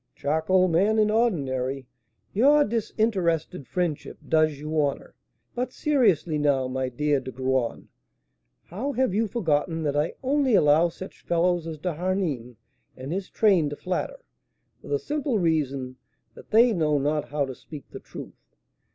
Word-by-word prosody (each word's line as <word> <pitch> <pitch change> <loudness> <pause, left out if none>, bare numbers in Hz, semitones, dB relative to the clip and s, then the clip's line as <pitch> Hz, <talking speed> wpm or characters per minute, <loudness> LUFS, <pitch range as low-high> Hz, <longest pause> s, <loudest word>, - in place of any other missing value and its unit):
"Charcoal 160 +5 +2
man 195 +6 +2
in 215 -1 +3
ordinary, 135 - 0 0.5
your 285 +8 +5
disinterested 190 - -1
friendship 175 -5 -3
does 155 -2 +2
you 155 +2 -1
honour. 140 -1 -2 0.4
But 250 +1 -3
seriously 200 - +2
now, 140 -3 +2
my 130 0 -2
dear 145 +3 +1
De 130 0 -7
Graün, 130 -2 -1 0.8
how 250 - -4
have 260 -6 +1
you 220 +2 +1
forgotten 165 -5 0
that 145 -2 -1
I 150 +2 0
only 270 -3 +2
allow 155 +1 +5
such 185 +3 -10
fellows 175 0 +1
as 160 -1 -5
D'Harneim 165 - -2 0.4
and 130 +5 -5
his 195 +1 -4
train 190 -9 +3
to 145 - -5
flatter, 185 - -3 0.6
for - - -13
the 430 - +1
simple 295 - -2
reason 140 -7 -1 0.4
that - - -15
they 230 +2 +5
know 155 -5 +1
not 145 +2 -1
how 145 -1 0
to 135 - -6
speak 145 +3 -11
the - - -8
truth? - - -11
165 Hz, 150 wpm, -25 LUFS, 145-210 Hz, 0.8 s, your